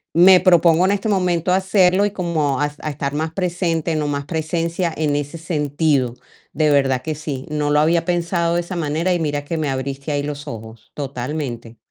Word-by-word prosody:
me 180 +2 +8
propongo 175 -1 +4
en 190 - +2
este 205 +2 -1
momento 180 -3 +1
hacerlo 190 0 +3
y 205 - -1
como 160 -8 -1
a 145 0 0
a 155 - -4
estar 140 0 -3
más 155 +2 -2
presente, 170 -3 -1
no 150 -1 -1
más 140 -1 -2
presencia 165 +2 -2
en 150 -2 0
ese 145 +3 -3
sentido. 150 -5 0 0.4
De 155 -1 +2
verdad 135 -3 +2
que 155 +3 -3
sí, 145 -3 -5
no 150 -1 -1
lo 150 - +4
había 165 +2 +3
pensado 170 -1 0
de 175 - +1
esa 175 +2 -7
manera, 165 +2 0
y 175 - 0
mira 145 -2 -2
que 165 - -3
me 155 -2 -1
abriste 135 +2 -4
ahí 145 -1 -1
los 145 0 -5
ojos, 110 -2 -9
totalmente. 125 -4 -5
155 Hz, 195 wpm, -20 LUFS, 145-175 Hz, 0.4 s, me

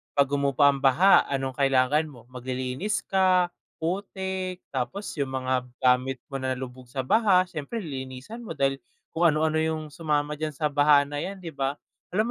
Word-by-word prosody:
pag 140 -1 +4
humupa 140 0 +3
ang 140 - -4
baha 140 +9 +5
anong 135 -2 -2
kailangan 135 +3 +3
mo? 125 -6 -13
Maglilinis 130 +9 -3
ka, 185 -2 +3 0.2
putik, 185 +1 -3
tapos 140 +10 -3
yung 135 -1 -1
mga 130 -1 0 0.2
gamit 130 +1 +3
mo 135 - -3
na 130 0 -1
lubog 125 -1 -8
sa 130 +1 -3
baha 190 - +4
sIyempre 155 +9 -5
lilinisan 135 - -7
mo - - -6
dahil 135 0 +1 0.3
kung 170 +1 +3
ano 155 0 +2
ano 155 0 +1
yung 160 -1 -1
sumama 150 -2 -1
diyan 155 -1 -2
sa 150 - 0
baha 145 0 +5
na 145 0 -4
yan 190 +4 -5
di 165 - -5
ba? 140 -1 -2 0.4
Alam 215 - +4
145 Hz, 175 wpm, -26 LUFS, 130-175 Hz, 0.4 s, baha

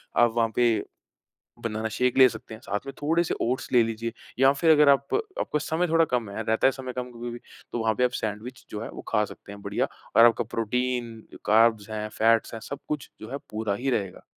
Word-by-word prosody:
आप 120 - +5
वहाँ 115 -1 +2
पे 115 -3 +3 0.8
बनाना 110 -1 -2
शेक 125 +3 0
ले 130 -1 +9
सकते 110 -1 -9
हैं, 110 - -12
साथ 105 +2 -4
में 135 - -5
थोड़े-से 165 +3 +1
ओट्स 125 +2 -1
ले 120 -2 +6
लीजिए, 115 0 -3 0.3
या 135 +1 +6
फिर 160 +3 +2
अगर 150 -2 +6
आप 140 0 +3 0.3
आपका 150 - 0
समय 160 +4 -1
थोड़ा 165 0 +4
कम 120 -4 0
है, 105 +3 -4
रहता 110 +2 +2
है - - +6
समय 130 -1 -6
कम 125 0 -5
कभी-कभी, 120 0 -6 0.3
तो - - -2
वहाँ 110 -1 +1
पे 125 - +1
आप 125 - +3
सैंडविच 110 +3 -5
जो 105 - -5
है, - - -5
वो - - -9
खा 105 - +2
सकते 100 - -11
हैं 100 - -10
बढ़िया, - - -1 0.3
और 115 - +9
आपका 120 -1 +4
प्रोटीन, 120 +1 -1 0.3
कार्ब्स 110 -1 +3
हैं, 110 0 -3
फैट्स 115 +1 +3
हैं, 115 - -6
सब 140 +5 -7
कुछ 150 -3 -4
जो 110 - -9
है, 140 - -3
पूरा 110 -1 -2
ही 130 +6 -1
रहेगा। 100 -7 -2
115 Hz, 225 wpm, -26 LUFS, 110-130 Hz, 0.8 s, ले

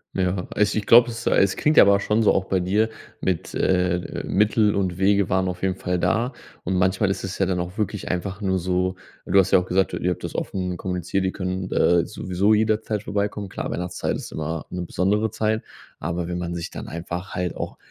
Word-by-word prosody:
Ja, 90 -1 0
also, 105 0 +2
ich 105 - -1
glaube, 120 +1 +7
es 115 +1 -6
es 95 -1 +3
klingt 150 +1 +2
ja - - +11
aber 100 0 +5
schon 105 +3 +1
so - - +5
auch 95 - 0
bei 95 -1 0
dir 105 +5 +1 0.3
mit, 90 -4 -2
äh, 90 -1 0
Mittel 105 0 +3
und 95 -3 -1
Wege 100 0 +3
waren 95 0 +1
auf 90 0 -6
jeden 95 -1 0
Fall 90 -1 -2
da. 115 +6 +1 0.3
Und 95 - -1
manchmal 95 +2 +2
ist - - -4
es 95 0 -4
ja 95 - +2
dann 90 -1 -1
auch 90 +2 -5
wirklich 105 -2 -2
einfach 95 +2 -3
nur 95 -2 +1
so 90 +1 0 0.3
du 100 - +2
hast 95 0 +4
ja - - +7
auch 90 - -4
gesagt, 95 +1 +1
ihr 90 - -1
habt - - -5
das - - -4
offen 90 -2 -3
kommuniziert, 90 +1 -2
die 95 - -1
können, 95 -1 -3
äh, 85 -1 +3
sowieso 95 +4 0
jederzeit 110 -1 +1
vorbeikommen. 100 -1 -2
Klar, - - -4
Weihnachtszeit 90 0 -2
ist - - -7
immer 80 0 -4
'ne 90 0 -4
besondere 105 +6 +1
Zeit, 110 0 0 0.4
aber 85 +2 -3
wenn 90 - -2
man 85 0 -3
sich 85 -1 -5
dann - - -7
einfach 85 +3 -6
halt 90 -1 -2
auch - - -5
95 Hz, 220 wpm, -23 LUFS, 90-100 Hz, 0.4 s, ja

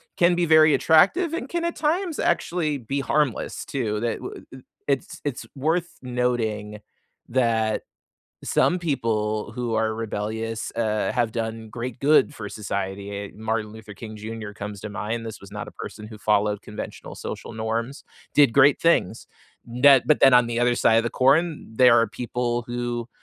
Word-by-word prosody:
can 175 0 +4
be 175 0 +1
very 155 -1 +6
attractive 300 - +4
and 335 - -3
can 345 -1 -2
at 340 - -2
times 330 +2 0
actually 165 -4 0
be 135 +4 -3
harmless 145 -3 -1
too. 110 -6 -2
Tha 120 0 -1
w - - -9
uh - - -10 0.3
It's 135 -2 -2
it's 145 -4 -4
worth 160 +5 0
noting 115 -4 -2 0.5
that 115 -3 +1 0.6
some 180 - +2
people 110 -9 -1
who 120 -1 -3
are 110 0 +1
rebellious, 110 0 -4
uh, 110 -2 0
have 120 -3 0
done 110 -1 -4
great 120 +1 -5
good 150 +1 +4
for 105 -4 -6
society, 100 -1 -4
eh, 100 0 -5
Martin 110 0 -2
Luther 110 -1 -11
King 110 +2 -9
Junior 110 0 -7
comes 105 -2 -7
to 110 - -6
mind. 110 +3 -4
This 110 - -8
was 100 - -13
not 105 - -6
a - - -12
person 105 0 -8
who 110 -2 -11
followed 105 -1 +1
conventional 105 - -8
social - - -7
norms, 115 +4 -3 0.3
did 140 -6 +5
great 140 +1 +5
things. 115 - +1 0.6
That 135 -3 +7
but 150 - +3
then 135 -2 +7
on 125 -1 +6
the 120 0 -1
other 120 0 +3
side 110 - +4
of - - -6
the 120 - -1
corn, 145 +7 +5 0.3
there 125 -2 +8
are 115 - +1
people 120 -1 -2
who, 120 -1 -3
115 Hz, 175 wpm, -24 LUFS, 110-140 Hz, 0.6 s, there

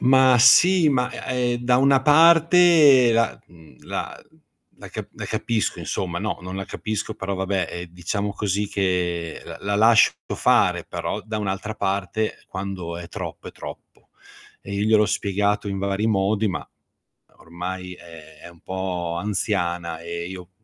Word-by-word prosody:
Ma 130 0 +5
sì, 170 +7 +6
ma, 125 -3 +1 0.2
e 125 -1 0
ehm, 120 - -2
da 125 0 +3
una 135 +1 +4
parte 160 -4 +6
la 115 0 +1
mhmm, 80 -6 -18
la - - -5 0.6
la - - -10
ca - - -7
la - - -7
capisco 115 -2 -2
insomma. 85 -2 -3
No, 105 +3 -3
non 90 +1 -7
la 95 - -4
capisco, 110 +1 -4
però 100 +1 -4
vabbè, 95 0 -1
ehm, 85 0 -6
diciamo 100 +4 -3
così 100 0 -2
che 90 -4 -2 0.2
la 100 0 -1
lascio 115 +1 +5 0.2
fare, - - +2
però - - -4
da 110 0 -4
un'altra 105 +1 -3
parte, 100 +1 -2
quando 95 -3 -5
è 85 0 -8
troppo - - -7
è - - -12
troppo. - - -12 0.5
E 100 - -9
io 100 - -1
gliel'ho 110 -1 +4
spiegato 100 0 -1
in 100 -1 -3
vari 100 +2 -1
modi, 105 0 +1
ma 90 - -4 0.7
ormai 90 +2 -7
è 80 -3 -13 0.2
è - - -11
un 85 -1 -19
po' 90 -2 -4
anziana 90 -5 -2
e 85 +1 -6
io 90 -1 -9
100 Hz, 155 wpm, -23 LUFS, 90-115 Hz, 0.7 s, sì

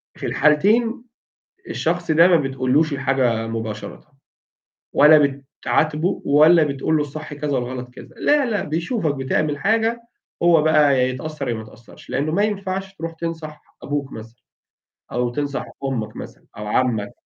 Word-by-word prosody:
في - - -7
الحالتين 220 - +2 0.7
الشخص 175 0 -1
ده 165 +3 +6
ما 175 - +5
بتقولوش 135 +2 +1
الحاجة 130 -5 0
مباشرةً، 115 +6 -6 0.8
ولا 145 -2 +5 0.2
بتعاتبه 155 +4 +1
ولا 155 +3 +6
بتقول 145 +2 -1
له - - +1
الصح 150 +1 -6
كذا 145 0 -4
والغلط 125 0 -5
كذا. - - -14
لا 290 -2 +3
لأ، 215 -4 -1
بيشوفك 165 - -2
بتعمل 140 +2 -1
حاجة، 225 +5 +1 0.4
هو 170 -3 +5
بقى 150 -2 +4
هيتأثر 130 +5 -2
يا - - 0
ما 110 - -5
يتأثرش؛ 115 +2 -17
لأنه 145 +3 -1
ما 200 +6 +1
ينفعش 195 -2 -3
تروح 165 -2 -6
تنصح 160 -2 -6 0.2
أبوك 145 -1 -3
مثلًا، 115 +1 -11 0.7
أو 125 0 0
تنصح 140 +2 -3 0.2
أمك 115 -6 -3
مثلًا - - -10
أو 105 0 -6
عمّك 110 -2 0
150 Hz, 145 wpm, -21 LUFS, 130-165 Hz, 0.8 s, ده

